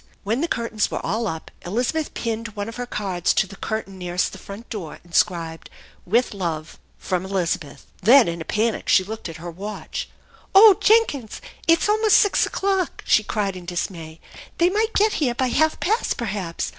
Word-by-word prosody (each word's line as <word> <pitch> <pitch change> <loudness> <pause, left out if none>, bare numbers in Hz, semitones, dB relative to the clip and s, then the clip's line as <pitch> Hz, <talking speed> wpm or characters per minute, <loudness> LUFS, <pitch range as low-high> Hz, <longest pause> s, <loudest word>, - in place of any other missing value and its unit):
When 225 +6 -1
the 335 - +1
curtains 230 -6 -1
were - - -4
all 225 +1 -1
up, 160 -4 -6
Elizabeth 245 - -2
pinned 225 -2 -3
one 205 0 -3
of 230 - -7
her 245 0 -4
cards 190 -6 -1
to - - +3
the 195 - -12
curtain 195 -3 -5
nearest 180 0 -1
the 190 - -10
front 200 +4 -10
door, 190 -9 -6
inscribed, 170 -1 0 0.4
"With 235 +5 +2
love 165 -5 -4 0.2
from 185 -1 -2
Elizabeth." 180 -5 -3 0.2
Then 240 +5 +7
in 170 0 -3
a - - -3
panic 220 +6 -1
she 190 - +5
looked 215 -1 -6
at 165 - -8
her 170 +1 -7
watch. 200 +5 -6 0.2
" - - -28
Oh 405 0 +10
Jenkins! 415 - +2 0.3
It's 330 +2 +4
almost 430 0 +4
six 410 - +3
o'clock," 385 -3 -1
she - - +4
cried 205 -3 -2
in 180 -1 -9
dis 175 +2 -2
may. 160 -2 -10 0.4
"They 345 +1 +4
might 440 +3 0
get 425 +1 +3
here 245 -5 +1
by 260 0 0
half 315 +5 +2
past, 435 +6 0
perhaps. 195 -7 -3
215 Hz, 190 wpm, -23 LUFS, 180-260 Hz, 0.4 s, Oh